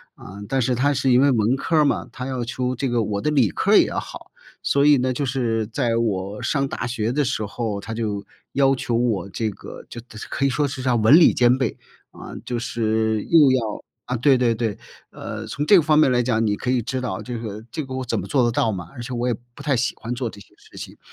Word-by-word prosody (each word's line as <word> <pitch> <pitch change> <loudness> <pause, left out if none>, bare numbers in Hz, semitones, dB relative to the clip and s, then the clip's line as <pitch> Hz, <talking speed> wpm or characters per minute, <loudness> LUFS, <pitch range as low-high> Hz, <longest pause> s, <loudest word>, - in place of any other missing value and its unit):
呃， 100 +2 -11
但 135 - +1
是 125 +1 +1
他 140 +4 +2
是 135 -2 +1
因 125 +2 +5
为 140 - +5
文 115 0 +2
科 165 +4 -2
儿 150 - +5
嘛， - - 0
他 125 - -6
要 130 -2 -3
求 125 +2 -2
这 130 +1 -2
个 120 -2 +1
我 100 -1 -2
的 150 - 0
理 130 - +3
科 - - 0
儿 - - +8
也 - - +6
要 - - -3
好。 - - -10 0.3
所 140 0 +2
以 145 -1 +6
呢， 130 0 0
就 140 +1 -2
是 115 -4 -1
在 115 0 -1
我 100 -3 -2
上 140 -2 0
大 125 - -4
学 115 -2 -2
的 145 +2 +1
时 110 -3 -2
候， 105 -1 -3
他 110 +3 -7
就 105 -3 -3 0.3
要 135 -1 +3
求 120 -2 -2
我 115 -5 0
这 110 +1 -2
个 - - -11
就 120 - -9
特 110 -2 -15
就 - - -8
可 140 - -2
以 140 - +4
说 145 +2 0
是 130 -1 -6
啥 125 -2 +1
文 110 +4 +4
理 165 - +7
兼 125 0 +4
备。 130 -5 -2 0.3
呃， - - -10
就 120 - -3
是 110 -2 -1
又 150 -5 +6
要 115 -5 -1 0.2
啊， 125 - -2
对 135 +3 +4
对 120 -2 +2
对， 110 -3 -2 0.4
呃， 110 0 -7
从 140 +7 -4
这 205 - +7
个 175 - +7
方 155 -1 +3
面 145 - +5
儿 - - +1
来 120 -1 +2
讲， 115 -2 +1
你 105 - +1
可 125 - -2
以 125 -2 +1
知 130 +3 -3
道 120 -7 -4
这 120 -1 -5
个 110 -1 -7
这 155 - -4
个 130 - -8
我 130 - -3
怎 125 - -2
么 - - -5
做 135 -4 +1
得 120 - +2
到 115 -1 +1
嘛， 85 -4 -6
而 - - -11
且 125 +1 -6
我 120 +1 -1
也 120 - +1 0.2
不 145 - -12
太 140 -2 +1
喜 120 +1 0
欢 115 - -7
做 125 -1 -3
这 100 -2 -10
些 - - -16
事 - - -20
情。 - - -9
120 Hz, 295 characters per minute, -22 LUFS, 110-130 Hz, 0.4 s, 儿